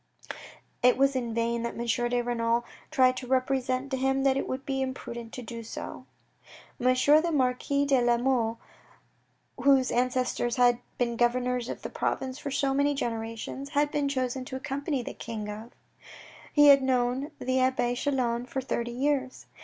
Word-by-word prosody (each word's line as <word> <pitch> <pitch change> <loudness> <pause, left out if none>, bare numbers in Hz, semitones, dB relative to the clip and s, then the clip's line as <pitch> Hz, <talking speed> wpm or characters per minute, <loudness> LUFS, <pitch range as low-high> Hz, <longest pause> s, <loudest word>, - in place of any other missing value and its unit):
It 250 0 +5
was 275 0 +3
in 240 -3 -2
vain 235 0 0
that 235 - -4
M. 235 - -3 0.2
de 245 0 +1
Renal 235 0 0 0.2
tried 255 -4 +4
to 250 - -6
represent 260 +1 0
to 265 - 0
him 270 +1 +1
that 270 -1 +3
it 275 - -2
would 260 +1 -4
be 270 -1 -1
imprudent 235 -3 -5
to 250 - -6
do 230 0 -7
so. 225 - -8 0.8
M. - - -2
the 305 +6 +4
Marquis 280 0 +1
de 270 -3 +3
La 240 0 +3
Mole 235 -2 +1 1.0
whose 270 -2 +4
ancestors 250 -1 0
had 245 -1 +4 0.2
been 235 -1 -1
governors 245 0 +1
of - - -6
the - - -4
province 260 0 -2
for 285 - -5
so 275 0 0
many 285 +1 +2
generations, 230 +2 -4
had 290 +1 +1
been 285 -1 0
chosen 260 -1 -2
to 260 - -7
accompany 275 0 -3
the - - -6
King 220 -2 -6
of 215 +3 -7 0.8
He 295 -1 +7
had 275 -1 +8
known 260 +2 0
the 260 +1 0
abbe 255 -2 +1
Chelan 245 -2 -1
for 265 - -3
thirty 240 -2 -2
years. 265 +1 -1
255 Hz, 170 wpm, -28 LUFS, 240-270 Hz, 1.0 s, had